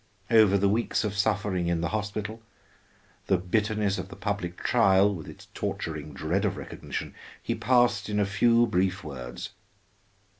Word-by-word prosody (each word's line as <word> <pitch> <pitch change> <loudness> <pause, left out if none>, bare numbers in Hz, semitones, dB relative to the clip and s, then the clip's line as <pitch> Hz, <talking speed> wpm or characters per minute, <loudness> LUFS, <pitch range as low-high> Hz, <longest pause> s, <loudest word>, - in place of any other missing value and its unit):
Over 110 -3 +6
the 100 0 +2
weeks 110 +2 +1
of 105 -2 -2
suffering 100 -3 0
in 85 -1 0
the 85 - -1
hospital, 105 +1 -4 0.9
the 95 - +3
bitterness 105 +2 0
of 90 +1 -6
the - - -9
public 100 -4 -3
trial 95 +1 +4
with 80 -5 -7
its - - -11
torturing 75 -2 -4
dread - - -1
of - - 0
recognition, - - -6 0.3
he - - -2
passed 120 -5 +2
in 105 0 0
a 105 - +3
few 115 +4 +4
brief 95 -3 0
words. 60 -4 -7
100 Hz, 155 wpm, -27 LUFS, 90-105 Hz, 0.9 s, Over